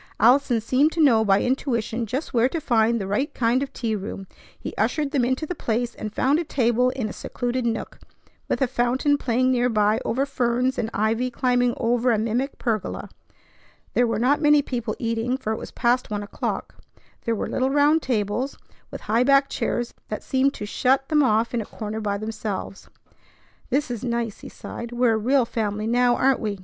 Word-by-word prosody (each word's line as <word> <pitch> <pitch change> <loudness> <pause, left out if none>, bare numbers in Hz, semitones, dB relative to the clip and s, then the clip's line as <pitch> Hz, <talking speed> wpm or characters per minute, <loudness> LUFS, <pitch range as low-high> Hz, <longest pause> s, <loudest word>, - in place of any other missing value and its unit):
Allison 255 -2 +4
seemed 265 +7 +2
to 335 - -4
know 240 -8 +5
by 195 -2 +3
intuition 240 -3 -1
just 265 +9 -4
where 240 +1 +3
to 330 - -2
find 235 -4 +2
the 195 - -3
right 205 +9 -1
kind 240 +2 +2
of 275 - -3
tea 225 -3 -2
room. 195 -1 -6 0.3
He - - -6
ushered 300 -3 0
them 275 -5 +1
into 260 +5 0
the 360 - -4
place, 240 -5 -2
and 215 - -6
found 275 +8 +2
a - - -1
table 250 -4 +2
in 255 -3 -3
a - - -6
secluded 245 0 -3
nook, 225 - -4 0.5
with - - +1
a - - +2
fountain 255 +4 +1
playing 255 0 +1
nearby 225 -4 +2
over 265 +4 0
ferns, 250 0 0
and 225 - -1
ivy 225 +4 0
climbing 245 0 +1
over 245 +1 +1
a 225 - +2
mimic 230 +6 -1
pergola. 220 -5 -3 0.8
There 245 - +3
were 225 -2 -1
not 275 +7 +2
many 295 -1 +5
people 235 -5 -3
eating, 230 +2 -1
for 220 -4 -2
it - - -4
was - - -7
past 245 +1 0
one 205 -1 -3
o'clock. 200 - -4 0.5
There 230 - +1
were - - -3
little 260 +1 0
round 290 +3 +4
tables 240 +2 -1 0.3
with - - -8
high 230 +3 +2
backed 275 +1 +4
chairs 240 0 -2
that 215 - -5
seemed 270 +1 +1
to 210 - -5
shut 260 +5 +1
them 305 -2 +4
off 225 -2 +2
in 235 - 0
a - - -6
corner 215 +1 -5
by 205 -1 -1
themselves. 215 -2 -5 0.8
"This 275 0 0
is 240 -1 -5
nice!" 235 -3 -2
he - - -10
sighed. 235 0 -8
"We're 240 -1 +2
a - - +1
real 250 +4 +2
family 215 -2 -2
now, 245 +1 +3
aren't 265 0 +2
we?" 210 -4 -3
240 Hz, 200 wpm, -24 LUFS, 220-260 Hz, 0.8 s, know